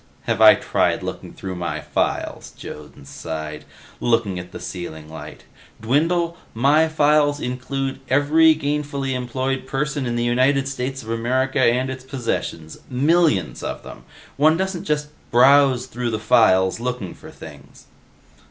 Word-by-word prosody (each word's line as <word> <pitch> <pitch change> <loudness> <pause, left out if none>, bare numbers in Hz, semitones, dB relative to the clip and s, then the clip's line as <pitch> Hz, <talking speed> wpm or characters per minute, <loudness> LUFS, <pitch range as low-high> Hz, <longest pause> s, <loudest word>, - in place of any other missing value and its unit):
"Have - - -1
I - - +9
tried - - 0
looking - - -6
through 95 -1 -7
my 85 -3 -3
files," - - -3
Jones 75 -2 -10
sighed, 80 -1 -6 0.3
looking 115 -6 +1
at 90 0 -9
the - - -8
ceiling 80 -4 -7
light. 80 +1 -10 0.4
"Dwindle, 165 +8 +1 0.2
my 145 +7 +4
files 150 -2 +2
include 135 +1 -3
every 155 +4 +5
gainfully 145 -2 -2
employed 130 +1 -3
person 145 0 -2
in 120 - -2
the 120 - 0
United 130 +3 +2
States 135 -1 -4
of 110 - -6
America 130 +4 0
and 130 +1 +2
its 130 0 -7
possessions. 115 - -4
Millions 140 - +2
of - - -5
them. - - -11 0.3
One 155 +3 +4
doesn't 190 -1 -3
just 150 -1 -1 0.2
browse 130 0 +5
through 125 -1 -4
the 110 - -1
files 100 -5 +3
looking 125 -6 -4
for - - -13
things." - - -13
130 Hz, 145 wpm, -21 LUFS, 115-145 Hz, 0.4 s, I